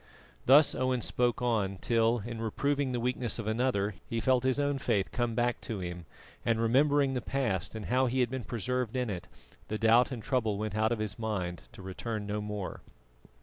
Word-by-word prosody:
Thus 145 +4 +7
Owen 130 -2 0
spoke 125 0 0
on 105 -5 +1
till, 115 +1 +2
in 115 -1 -5
reproving 140 +4 0
the 125 - -1
weakness 125 -1 -1
of 115 - -4
another, 110 -2 0
he 115 - -2
felt 130 +1 +2
his 130 +1 +1
own 145 -1 +1
faith 105 -7 0
come 120 -3 -1
back 120 +1 0
to 110 - -4
him 90 -2 -6 0.4
and, 115 -1 +1
remembering 135 +4 +3
the 125 - -1
past 115 -10 -1
and 110 -2 -5
how 130 +2 +2
he 130 +2 0
had 120 -1 +1
been 130 -3 -4
preserved 125 +1 -2
in 125 -4 -1
it, 90 -3 -6 0.4
the 110 - -2
doubt 115 +4 +4
and 120 -4 -5
trouble 110 -5 0
went 105 -1 -3
out 110 +1 +2
of 120 - +1
his 105 0 -4
mind 95 -6 -3
to 105 -5 -11
return 105 +3 -4
no 105 +1 -2
more. 105 -2 -5
115 Hz, 200 wpm, -30 LUFS, 105-125 Hz, 0.4 s, Thus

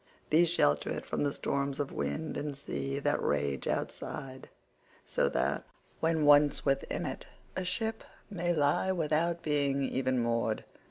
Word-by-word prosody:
These 165 +2 +5
shelter 75 - +2
it - - -3
from - - -2
the 145 - +1
storms 140 0 -2
of 145 -1 -2
wind 160 0 -3
and 145 -2 -3
sea 135 -1 -3
that 145 +1 +1
rage 70 -2 0
outside, 130 -1 -4 0.6
so - - +1
that, - - 0 0.4
when 160 -2 +2
once 145 0 +5
within 135 0 0
it, - - -5 0.3
a 190 - -1
ship 220 +5 -2 0.2
may 175 -4 -1
lie 150 +3 +2
without 170 0 0
being 140 -2 +1
even 130 -1 0
moored. 115 -2 0
145 Hz, 150 wpm, -31 LUFS, 135-165 Hz, 0.6 s, These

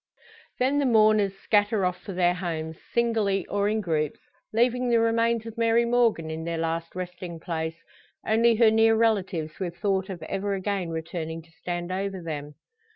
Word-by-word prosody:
Then 265 +3 +2
the 280 - +2
mourners 215 -4 +4
scatter 205 0 +2
off 180 0 -2
for 200 - -7
their 175 -1 +3
homes, 160 -3 -4
singly 220 -5 +1
or 205 0 0
in 215 0 0
groups, 155 -5 -1 0.3
leaving 245 +2 +2
the 235 -1 +4
remains 230 0 +2
of 225 0 -8
Mary 230 +1 +3
Morgan 230 -9 +2
in 160 +1 -5
their 170 0 -3
last 165 +1 -3
resting 180 -2 -6
place, 160 0 -4 0.4
only 230 +1 +4
her 220 -1 +5
near 225 0 +5
relatives 195 -8 0
with 175 -3 -4
thought 195 -2 0
of 175 -4 -6
ever 195 +4 -2
again 195 -2 -2
returning 160 0 -5
to 165 - -23
stand 175 +1 -5
over 195 0 -2
them. 150 -3 -6
195 Hz, 170 wpm, -26 LUFS, 165-225 Hz, 0.4 s, her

